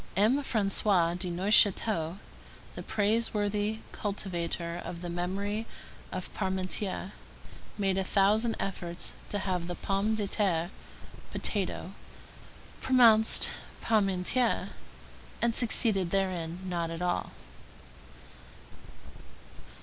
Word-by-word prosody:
M. 225 +8 +4
François 195 -6 +2
de 180 0 -3
Neufchâteau, 190 -1 +3 0.6
the - - -7
praiseworthy 210 0 0
cultivator 175 -4 -3
of 170 - -6
the 175 -1 -4
memory 200 +5 -2 0.4
of 185 -1 -6
Parmentier, 190 0 -2 0.7
made 195 -2 +1
a - - +1
thousand 210 +4 +3
efforts 175 -3 -3 0.2
to 205 - -1
have 185 -3 -2 0.2
pomme 200 +3 +1
de 210 -2 -1
terre 180 -4 0 0.6
[potato] 190 -2 -2 0.9
pronounced 230 -4 +5 0.3
parmentière, 215 +3 +1 0.7
and 235 -1 +2
succeeded 220 -6 +3
therein 180 -3 -1
not 170 -2 -2
at 165 +1 -4
all. 175 0 -1
195 Hz, 90 wpm, -30 LUFS, 180-215 Hz, 0.9 s, pronounced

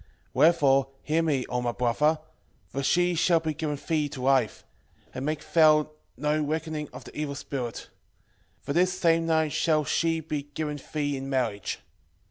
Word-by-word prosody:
wherefore 140 -3 +4 0.2
hear 160 +2 +1
me, 145 -6 0
O 125 0 -1
my 120 -1 0
brother; 150 +7 +2 0.5
for 140 - -3
she 175 +5 +2
shall 170 0 +3
be 160 -1 -2
given 150 -1 -2
thee 155 -3 +1
to 135 -3 -7
wife; 130 -4 +2 0.5
and 130 - -5
make 155 +1 -2
thou 155 -2 +5 0.3
no 150 +3 +1
reckoning 155 0 -3
of - - -10
the - - -13
evil 150 -2 -3
spirit; 125 -4 -5 0.8
for 140 - -3
this 180 +3 +2
same 165 -2 +2
night 160 -2 +2
shall 155 -2 +2
she 165 +2 +1
be 150 -2 -3
given 150 -2 -3
thee 145 -2 0
in 135 0 -5
marriage. 120 -7 -1
150 Hz, 165 wpm, -27 LUFS, 135-160 Hz, 0.8 s, thou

